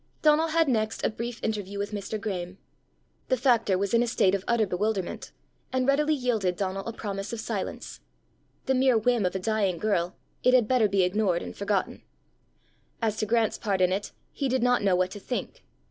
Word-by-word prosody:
Donal 310 +1 +5
had 325 0 +2
next 220 -4 0
a - - +1
brief 235 +2 -6
interview 205 -2 -3
with 200 +1 -3
Mr. 210 +1 -4
Graeme. 190 -3 -4 0.7
The 255 - +2
factor 230 -7 +3
was 200 +2 -2
in 235 - +5
a 240 - +1
state 195 -5 +2
of 195 -1 -1
utter 235 -2 +3
bewilderment, 195 0 -2 0.4
and 260 0 0
readily 300 +2 +3
yielded 225 -9 0
Donal 195 +1 -3
a - - -2
promise 200 -3 -5
of 230 - -4
silence: - - -5 0.7
the 265 - +2
mere 260 -2 +4
whim 225 -3 +2
of 180 - -4
a - - 0
dying 200 -2 0
girl, 180 -2 0 0.3
it 250 0 +5
had 240 -4 +4
better 250 -3 +3
be 195 -1 +2
ignored 180 -1 +1
and - - -8
forgotten! 200 -1 -1 1.0
As 220 -2 -1
to 215 - -1
Grant's 225 0 +1
part 200 -4 -1
in 185 0 +3
it 195 +2 -2 0.2
he 275 - -2
did 255 -1 +1
not 245 0 +3
know 195 -3 +3
what 180 0 +1
to 205 - -7
think. 245 +5 -5
215 Hz, 200 wpm, -27 LUFS, 195-245 Hz, 1.0 s, Donal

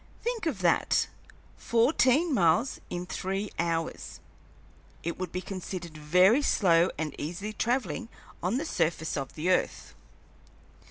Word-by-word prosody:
Think 475 -1 -2
of - - -2
that - - +3 0.5
fourteen 260 +6 +3
miles 185 +4 +2
in 175 0 -4
three 195 +3 -3
hours! 165 -1 -2 0.8
It 170 +2 -3
would 185 -2 -4
be 180 - -3
considered 180 -3 -6
very 180 - +4
slow 175 -9 +4
and 155 -3 -3
easy 180 +8 -4
travelling 240 +1 -1 0.3
on 185 +8 0
the 300 - -2
surface 160 - -1
of 135 -2 -4
the 170 +4 0
earth. - - -1
185 Hz, 125 wpm, -28 LUFS, 165-235 Hz, 0.8 s, very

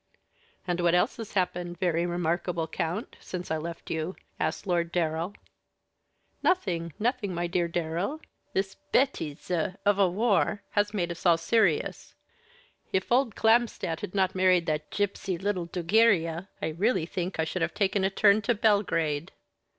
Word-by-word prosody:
"And 175 -1 0
what 175 0 +3
else 180 +7 +2
has 225 -3 -7
happened 180 -2 -1
very 175 -1 +1
remarkable, 175 -1 -1
count, 175 +6 -3
since 180 -3 -6
I 160 - +1
left 170 +2 -6
you?" 160 +3 -2 0.2
asked - - -1
Lord 170 -2 0
Darrell. 170 +2 -1 1.1
"Nothing, 175 - +1
nothing, 225 -5 -1
my 175 +1 -1
dear 175 0 0
Darrell. 170 - -2 0.3
This 195 0 -1
bêtise 180 - 0
of 205 0 +3
a 195 -2 +5
war 205 +1 +1
has 205 0 +1
made 175 -5 -1
us 170 - -8
all 170 -2 +5
serious. 175 -1 +1 0.8
If 190 +3 -1
old 245 -3 +3
Clamstandt 225 -7 +2
had 180 - -6
not 190 -2 +2
married 185 -2 +3
that 155 -1 -2
gipsy 200 -2 -1
little 185 -2 -2
Dugiria, 180 -1 +2
I - - +1
really 185 +2 +1
think 180 +2 -4
I - - +3
should 180 +2 -3
have - - -1
taken 200 -1 +1
a 190 - +3
turn 200 +2 +4
to 235 +3 +1
Belgrade." 170 -7 +1
180 Hz, 155 wpm, -28 LUFS, 170-205 Hz, 1.1 s, a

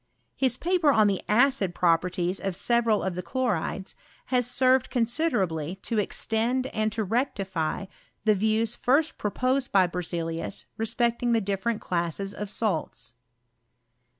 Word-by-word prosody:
His 255 -2 +1
paper 345 -4 +2
on 220 -5 +4
the 200 -2 +1
acid 225 -5 +3
pro 170 -2 +4
perties 180 +2 -2
of 195 -2 -3
several 230 0 +2
of 190 - -1
the 180 - -4
chlorides, 200 -5 -2 0.4
has 245 -1 +2
served 255 0 +3
con 240 -2 +1
siderably 195 - -1
to 230 -3 -1
extend 230 +5 0
and 215 0 0
to 220 - -1
rectify 195 - -2 0.4
the 215 - +5
views 220 +3 0
first 295 +5 +1
proposed 255 +5 0
by 190 -2 +5
Berzeliusrespecting 205 +8 -2
the 230 - +4
different 200 +3 -2
classes 175 +3 -2
of 210 0 -6
salts. 185 - -3
215 Hz, 135 wpm, -26 LUFS, 185-245 Hz, 0.4 s, the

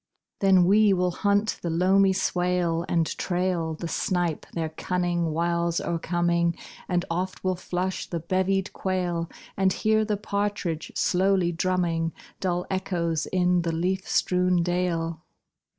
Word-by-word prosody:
Then 190 -2 +5
we 205 +2 +5
will 180 -1 +1
hunt 205 +3 +1
the 170 - -2
loamy 190 +4 +4
swale 180 -3 0
And 165 -2 +2
trail 175 -3 -1
The 170 - -5
snipe, 175 -2 -1
their 165 -2 -2
cunning 175 +1 -1
wiles 170 +1 0
o'ercoming; 170 0 0 0.3
And 175 -1 +1
oft 185 +2 -3
will 185 -1 +1
flush 180 +1 -3
the 170 - -3
bevied 190 +3 0
quail, 175 -3 -2 0.3
And 190 -1 +2
hear 220 +2 +2
the 210 -1 -1
partridge 200 -5 -2
slowly 185 -1 +2
drumming 170 -2 0 0.3
Dull 180 -1 -1
echoes 170 -4 -1
in 180 -1 +2
the 165 -1 -1
leaf 185 +3 -1
strewn 180 -1 +2
dale. 170 -2 -1
180 Hz, 135 wpm, -26 LUFS, 170-190 Hz, 0.3 s, Then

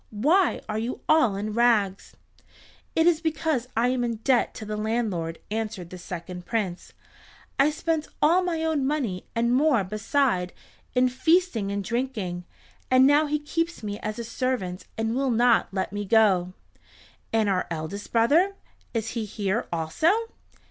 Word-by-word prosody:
Why 310 - +2
are 215 0 -2
you 235 +3 -4
all 310 -10 +4
in 210 +2 -3
rags?" 215 -4 +1 0.8
"It 325 - +4
is 335 -2 +4
because 315 -6 -1
I 240 +2 +3
am 255 -1 0
in 235 -1 -1
debt 240 +2 +1
to 215 - -7
the 210 0 -4
landlord," 210 -7 -2
answered 215 -5 -4
the 185 - -8
second 180 0 -7
Prince. 200 -6 -3 0.7
"I 275 +2 +5
spent 315 0 -2
all 340 +5 +4
my 340 -3 -1
own 300 -4 +1
money 250 -11 -2
and 235 +1 +2
more 265 -5 +3
beside 215 -1 0 0.4
in 250 0 +4
feasting 260 - +1
and 200 0 -2
drinking, 215 -7 -3 0.4
and 255 0 +6
now 295 +2 +4
he 300 +1 +1
keeps 330 0 -3
me 205 0 -4
as 215 0 -4
a 235 - -4
servant 230 -6 -3
and 225 +1 -1
will 270 0 +1
not 240 0 +3
let 190 0 -2
me 205 0 -2
go." 190 -4 +3 0.8
"And 220 -2 +2
our 185 -2 0
eldest 165 +5 -5
brother—is 235 - 0
he 225 -1 -3
here 205 +1 -2
also?" 165 - +1
230 Hz, 155 wpm, -26 LUFS, 200-275 Hz, 0.8 s, and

